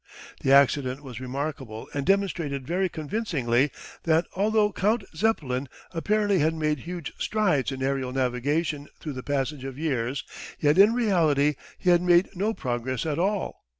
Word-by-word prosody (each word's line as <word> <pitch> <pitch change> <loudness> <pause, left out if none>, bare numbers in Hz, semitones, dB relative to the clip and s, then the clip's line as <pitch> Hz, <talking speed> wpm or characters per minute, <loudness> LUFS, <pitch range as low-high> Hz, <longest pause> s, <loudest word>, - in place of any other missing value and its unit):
The 135 - +1
accident 140 0 +4
was 125 -4 -8
remarkable 130 -3 -5
and 140 -1 -3
demonstrated 170 -9 0
very 185 +4 0
convincingly 150 - 0 0.3
that 165 +1 +2
although 210 +2 +2
Count 210 +3 +1
Zeppelin 140 - 0 0.2
apparently 205 +3 +1
had 160 +2 +2
made 150 -2 0
huge 170 0 -6
strides 180 -12 +1
in 130 0 -4
aerial 135 -1 -1
navigation 140 +4 -1
through 150 - -5
the 130 - -6
passage 140 0 -2
of 135 -1 -6
years, 135 -4 -1 0.4
yet 150 +4 +3
in 210 +4 +7
reality 160 - +3 0.2
he 180 - +2
had 175 0 +5
made 175 +1 +4
no 205 +5 0
progress 125 - -3
at 155 0 -1
all. 200 +2 -1
150 Hz, 150 wpm, -26 LUFS, 135-180 Hz, 0.4 s, in